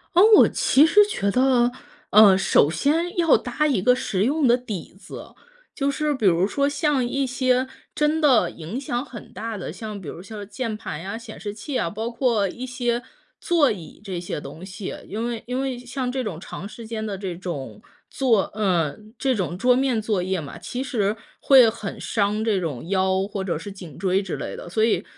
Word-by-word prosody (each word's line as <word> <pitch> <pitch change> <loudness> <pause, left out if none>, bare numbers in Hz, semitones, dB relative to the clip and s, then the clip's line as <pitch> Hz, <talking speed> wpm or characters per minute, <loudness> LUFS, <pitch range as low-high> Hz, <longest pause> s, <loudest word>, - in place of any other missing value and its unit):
哦， 355 - +7 0.2
我 - - +8
其 285 +3 +4
实 415 +6 +6
觉 200 - -1
得， 250 0 +3 0.4
呃， 205 -2 +8
首 190 -6 +4
先 320 - 0
要 335 -3 +5
搭 250 +5 -1
一 265 -10 +2
个 250 +6 +4
实 195 -6 -1
用 285 +4 +2
的 240 - +6
底 215 -9 -7
子。 - - -11 0.4
就 275 -1 0
是 300 +1 0
比 260 - -6
如 175 0 +4
说 280 +7 0
像 290 -2 +1
一 270 +3 -1
些 255 0 +1 0.3
真 300 +1 +1
的 245 - +4
影 170 +11 -6
响 245 -3 -2
很 245 -6 -11
大 225 -1 -5
的， 190 - -6
像 215 -2 -7
比 180 - -10
如 165 - -7
说 - - -13
像 205 -1 -7
键 225 -1 -4
盘 155 -8 -6
呀、 195 +5 -5
显 230 - -10
示 205 - -4
器 245 +7 -7
啊， - - 0
包 220 +5 -4
括 235 -4 +1
一 240 +7 -7
些 245 -1 -1 0.4
座 325 -5 +3
椅 180 -7 -8
这 190 -4 -4
些 175 - -4
东 160 +3 -10
西， 190 0 -6
因 220 +3 -3
为 235 -2 -4
因 250 +1 -2
为 270 -1 -2
像 250 +1 -4
这 260 0 -2
种 195 -8 -5
长 190 +2 -8
时 230 +1 -10
间 220 -1 -4
的 205 -3 -4
这 190 -3 -5
种 145 - -6 0.3
作 235 -7 +2
嗯， 200 - -1
这 265 -1 +1
种 180 - -2
桌 250 +5 +4
面 260 -3 +1
作 210 -3 0
业 185 +1 -1
嘛， 145 -3 -8
其 250 +1 -4
实 220 -5 -1 0.2
会 260 -4 +7
很 220 -2 -4
伤 210 0 0
这 215 -4 +1
种 160 -5 -4
腰， 190 0 +1
或 200 -2 -4
者 170 -4 -2
是 185 +6 -7
颈 180 -7 -11
椎 190 +1 +1
之 195 - -4
类 - - -5
的。 - - -9
所 220 +5 +2
以 225 - +1
220 Hz, 225 characters per minute, -23 LUFS, 190-255 Hz, 0.4 s, 我